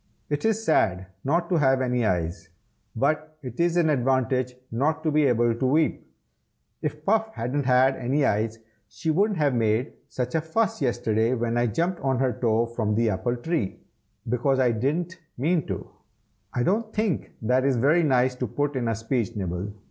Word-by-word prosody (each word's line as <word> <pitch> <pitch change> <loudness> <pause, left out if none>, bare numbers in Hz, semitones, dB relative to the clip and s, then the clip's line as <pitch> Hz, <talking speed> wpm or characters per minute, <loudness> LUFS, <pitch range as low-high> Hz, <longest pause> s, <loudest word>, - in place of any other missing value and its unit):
It 145 +5 -1
is 225 0 +1
sad 95 - +2 0.2
not 170 +5 +1
to 180 - +2
have 135 -3 +3
any 125 -2 0
eyes, 85 0 -2 0.5
but 155 +5 -1
it 125 -2 -8
is 170 0 +2
an 170 -2 +3
advantage 130 -1 +1 0.2
not 155 +7 0
to 155 - +1
be 150 -1 +3
able 120 -1 +2
to 120 +3 -2
weep. 155 +3 +1 0.7
If 150 0 -4
Puff 220 +1 +2
hadn't 130 +4 -2
had 130 +1 +4
any 135 +3 +1
eyes, 110 0 0 0.3
she 160 - -2
wouldn't 200 +4 +2
have 145 -3 +2
made 115 +2 +1
such 125 -1 -4
a 160 - +1
fuss 180 +6 -1
yesterday 120 -2 +1
when 120 -1 -1
I 120 0 +2
jumped 170 - -1
on 135 -2 0
her 130 -1 +1
toe 115 0 +1
from 115 -3 -2
the 115 0 +2
apple 120 +6 -1
tree, 120 - -2 0.5
because 125 +3 +1
I 130 -2 +3
didn't 160 +10 -2 0.2
mean 155 +3 +1
to." - - -5 0.6
"I 120 - -1
don't 215 - 0
think 210 -8 -1
that 125 +3 +2
is 135 -1 +2
very 145 +8 +3
nice 130 -4 +2
to 125 - -2
put 145 +5 -2
in 125 -3 -1
a 115 - 0
speech, 115 0 -2
Nibble!" 95 0 -3
130 Hz, 185 wpm, -25 LUFS, 115-155 Hz, 0.7 s, had